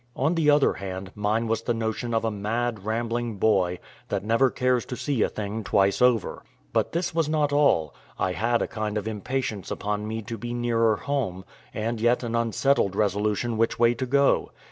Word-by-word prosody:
On 140 +6 +1
the 160 -3 +2
other 145 -1 +4
hand, 95 -1 -6
mine 105 +2 0
was 115 0 0
the 120 0 -1
notion 115 +1 -2
of 115 - +1
a 110 - 0
mad, 110 +1 -2
rambling 115 0 -2
boy, 95 -4 +2 0.3
that - - -1
never 115 +5 +3
cares 125 -1 +1
to 125 - -5
see 140 -6 -1
a - - +3
thing 105 +1 -4
twice 100 0 +2
over. 125 -6 +2 0.3
But - - +1
this 170 0 -1
was 165 -2 +1
not 150 -2 +1
all: 140 - +3 0.2
I 95 - 0
had 115 +5 +1
a - - -2
kind 110 -1 -3
of 105 +1 -3
impatience 110 -1 -3
upon 105 +1 -3
me 110 0 -4
to 115 -1 -6
be 120 +2 -4
nearer 115 -2 +2
home, 95 -4 -3 0.3
and 110 +1 -3
yet 120 +2 +2
an 115 -1 -3
unsettled 115 -2 +1
resolution 105 +2 0
which 115 +1 +1
way 120 0 +4
to 125 +2 -4
go. 140 +2 +3
115 Hz, 195 wpm, -25 LUFS, 105-125 Hz, 0.3 s, other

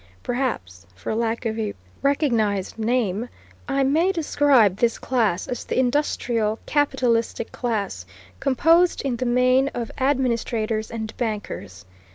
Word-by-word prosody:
Perhaps, 100 - -3
for 95 - -4
lack 230 +1 -1
of 225 0 -1
a 215 -2 -2 0.3
recognized 230 - +1
name, 225 -1 0 0.4
I 275 -1 +1
may 320 +8 +3
describe 285 - +3
this 235 0 +1
class 220 -8 0
as 245 - -4
the - - -3
industrial 245 -4 +1
capitalistic 250 -6 0
class, 200 - -3 0.3
composed 330 +7 +3
in 260 -4 -1
the 255 - -1
main 255 +2 +3
of 235 -2 -4
administrators 235 -5 0
and 220 -1 -5
bankers. 205 - -4
235 Hz, 125 wpm, -23 LUFS, 220-265 Hz, 0.4 s, may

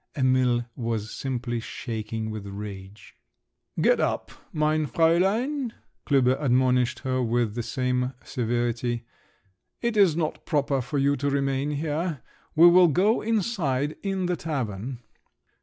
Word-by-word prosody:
Emil 130 -2 +2
was 115 -3 -3
simply 120 -3 -3
shaking 110 -1 -5
with 105 -2 -6
rage. 100 0 -9 0.7
"Get - - +4
up, - - -1 0.2
mein 155 0 +1
Fräulein," 215 - +1 0.3
Klüber 130 -1 +3
admonished 125 -2 +2
her 130 -1 -1
with 120 -2 0
the 120 - -2
same 125 +1 -1
severity, 120 0 -1 0.7
"it 235 -2 -1
is 195 -7 +5
not 160 -2 -2
proper 140 -3 0
for 130 +4 -3
you 140 +1 +3
to 140 - 0
remain 140 0 0
here. 150 -1 -2 0.3
We 165 +2 +7
will 180 +1 +7
go 195 - +2
inside, 175 - 0
in 195 -2 -1
the 180 0 0
tavern!" 125 - -4
130 Hz, 125 wpm, -26 LUFS, 120-160 Hz, 0.7 s, We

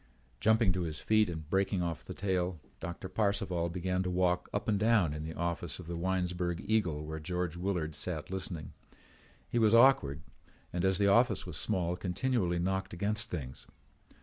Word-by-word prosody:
Jumping 110 -2 +4
to 90 - -2
his 80 -3 -3
feet 110 -2 +3
and 80 -3 -6
breaking 95 -1 +1
off 85 -3 -3
the - - -8
tale, 90 -3 -1 0.2
Doctor 85 +2 -5
Parcival 95 -4 0
began 90 +1 -1
to 90 - -1
walk 90 0 +1
up 105 - -2
and 105 -3 +2
down 105 -8 +3
in 75 0 -5
the 80 +1 -6
office 85 -2 -2
of 90 - -9
the 85 +1 -5
Winesburg 90 -1 -1
Eagle 90 -9 +1
where 80 +1 -5
George 90 +1 -2
Willard 85 -3 -2
sat 75 +2 -4
listening. 90 -4 -4 0.7
He 120 - 0
was 110 0 +5
awkward 115 - +5 0.5
and, 90 0 -1
as 95 -1 +3
the 100 - +3
office 110 +2 +4
was - - -7
small, 90 -1 0
continually 90 0 0
knocked 95 +2 -1
against 105 +5 -1
things. 65 -7 -6
90 Hz, 175 wpm, -32 LUFS, 85-100 Hz, 0.7 s, was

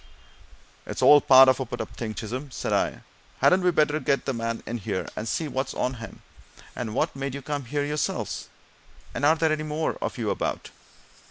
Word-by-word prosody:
"It's - - -3
all 145 0 +8
part 130 0 +8
of 130 0 +4
a 130 - -2
put 120 - -6
up - - -6
thing, 110 -2 -5
Chisholm," 125 +6 -5
said - - -3
I. - - 0 0.3
"Hadn't 185 +1 +4
we 180 - +3
better 155 -2 +2
get 140 -2 0
the 135 - -1
man 115 -1 -3
in 120 +1 -4
here, 95 -2 -3
and 110 - -4
see 160 +6 -1
what's 135 -2 -3
on 125 - -1
him? 115 - -10 0.5
And 115 -3 -4
what - - 0
made 135 0 -4
you 140 - -7
come 145 -1 -3
here 145 +3 -1
yourselves? 150 0 -3 0.6
and - - -4
are 155 +2 +5
there 160 -1 +1
any 155 0 0
more 155 +1 -2
of - - -3
you - - -1
about?" - - -3
135 Hz, 205 wpm, -26 LUFS, 120-150 Hz, 0.6 s, all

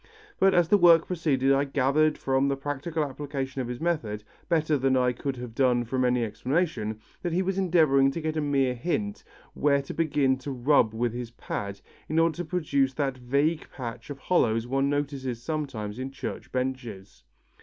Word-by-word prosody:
But 195 0 +4
as 175 -2 +4
the 205 - +5
work 170 -2 +7
proceeded 140 -6 +1
I 135 +1 +3
gathered 145 +2 +2
from 135 +1 +1
the 140 - +1
practical 145 +3 -2
application 135 -1 -4
of 125 - -4
his 125 0 -5
method, 135 -11 -2 0.3
better 155 -2 +2
than 135 -1 +2
I 125 -1 +3
could 135 +2 -4
have 120 -2 -7
done 125 -1 +2
from 130 +2 -1
any 125 -1 +2
explanation, 125 - -1 0.2
that 175 -2 -2
he 185 +2 +2
was 195 +1 -1
endeavouring 155 -7 +4
to 150 - -4
get 155 -1 -2
a 155 - 0
mere 135 -3 +1
hint, 205 - -3 0.3
where 140 -1 +2
to - - -7
begin 145 -5 +1
to 135 - -7
rub 125 -3 +2
with 120 0 0
his 120 -1 -5
pad, 100 -4 -5 0.3
in 155 - -1
order 165 -1 +3
to 175 - -3
produce 140 -6 0
that 135 -3 -1
vague 140 +6 0
patch 120 -1 -7
of 145 - -6
hollows 115 -8 +1
one 135 +2 0
notices 140 -4 -2
sometimes 130 -8 -4
in 130 +1 -3
church 135 - -7
benches. 125 - -4
135 Hz, 185 wpm, -27 LUFS, 125-155 Hz, 0.3 s, work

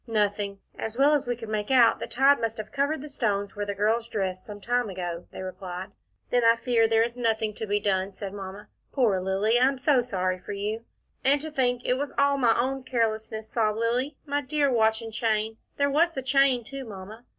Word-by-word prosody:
"Nothing 205 -2 0 0.2
as 225 +1 -4
well 285 +3 +5
as 290 -4 +1
we 245 - 0
could 225 -1 -9
make 210 -1 -2
out, 250 -4 +5
the - - -4
tide 275 +3 +4
must 225 0 -2
have 215 0 -7
covered 285 +1 0
the - - -6
stones 205 -8 -1
where 205 0 -3
the 200 - -2
girls 225 +3 +1
dressed, 190 -4 -3
some 205 -1 -8
time 245 +1 0
ago," 175 -2 -5
they - - -7
replied. 185 +1 -6 0.4
"Then 245 -1 +3
I 230 0 +6
fear 230 -1 +2
there 225 0 +4
is 235 +1 -3
nothing 220 -3 0
to 220 - -4
be 205 0 +1
done," 195 -1 0
said 195 -1 -6
Mamma. 200 +1 -8 0.2
"Poor 220 -9 +2
Lilly, 200 +5 +2
I 255 - +5
am 275 0 0
so 265 0 +3
sorry 185 -6 -1
for 185 - -7
you." 210 +3 -3 0.4
"And 280 +2 +4
to 315 0 -6
think 245 -3 +1
it 250 +1 +1
was 285 0 -3
all 280 0 +3
my 235 -3 +3
own 265 +2 0
carelessness," 220 -3 -2
sobbed 215 -2 +1
Lilly. 245 +5 0
"My 285 0 -1
dear 285 0 +1
watch 220 -1 +2
and 225 -1 -8
chain 220 -1 0 0.2
there 285 - +3
was 330 +4 +3
the 265 - -4
chain 265 -2 +3
too, 275 +3 -7
Mamma." 215 +1 -10
225 Hz, 225 wpm, -26 LUFS, 205-260 Hz, 0.4 s, I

